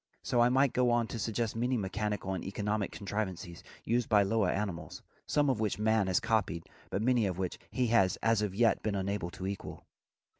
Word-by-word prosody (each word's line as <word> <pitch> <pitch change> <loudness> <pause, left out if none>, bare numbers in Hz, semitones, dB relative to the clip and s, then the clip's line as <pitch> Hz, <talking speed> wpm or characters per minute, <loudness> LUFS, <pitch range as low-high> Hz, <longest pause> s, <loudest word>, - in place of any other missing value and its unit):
So 120 - +2
I 120 - +5
might 135 +1 +3
go 125 -1 +3
on 120 -1 +2
to 115 - -5
suggest 115 +1 -1
many 125 +2 0
mechanical 105 -1 -2
and 95 - -4
economic 105 +1 -2
contrivances 95 -4 -4 0.2
used 120 0 0
by 105 -3 +5
lower 100 -1 +1
animals, 95 -4 -3 0.2
some 145 -1 +2
of 130 -5 +1
which 110 -3 0
man 110 -1 +2
has 95 -1 +2
copied 95 -7 0 0.3
but 100 - -1
many 120 -3 +3
of 90 -2 -3
which 95 -2 -3
he 125 - 0
has 95 -5 +4
as 115 -1 +3
yet 105 +3 +2
been 105 -2 -1
unable 100 -2 -2
to 95 - -7
equal. 100 0 -6
105 Hz, 195 wpm, -31 LUFS, 95-115 Hz, 0.3 s, I